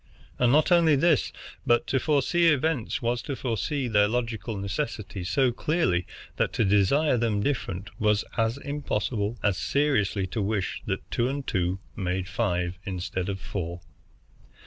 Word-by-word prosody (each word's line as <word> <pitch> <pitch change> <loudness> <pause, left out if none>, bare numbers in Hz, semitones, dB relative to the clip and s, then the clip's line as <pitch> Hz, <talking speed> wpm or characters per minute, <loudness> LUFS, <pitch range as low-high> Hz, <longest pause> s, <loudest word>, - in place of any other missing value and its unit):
And 125 -1 +4
not 155 +6 +4
only 165 -3 +6
this, 155 -1 +3 0.3
but 120 0 +3
to 135 - +1
foresee 155 +4 +2
events 150 -6 +1
was 120 +1 0
to 140 - -4
foresee 130 +3 -2
their 105 -3 +4
logical 115 -2 -2
necessity 100 -1 -3
so 125 +9 +2
clearly 120 - 0 0.3
that - - 0
to 115 - +2
desire 115 +9 +3
them 110 -3 +1
different 100 -8 -2
was 105 -1 +2
as 115 +2 +1
impossible 120 -6 -2
as 100 -3 +2
seriously 110 -10 +1
to 105 +4 -3
wish 100 -1 -1
that - - -4
two 120 +1 +1
and 140 0 -3
two 90 -1 0 0.2
made 95 -1 -2
five 90 -5 -1
instead 95 -1 -3
of 95 -1 -3
four. 85 -3 -5
115 Hz, 150 wpm, -27 LUFS, 95-140 Hz, 0.3 s, only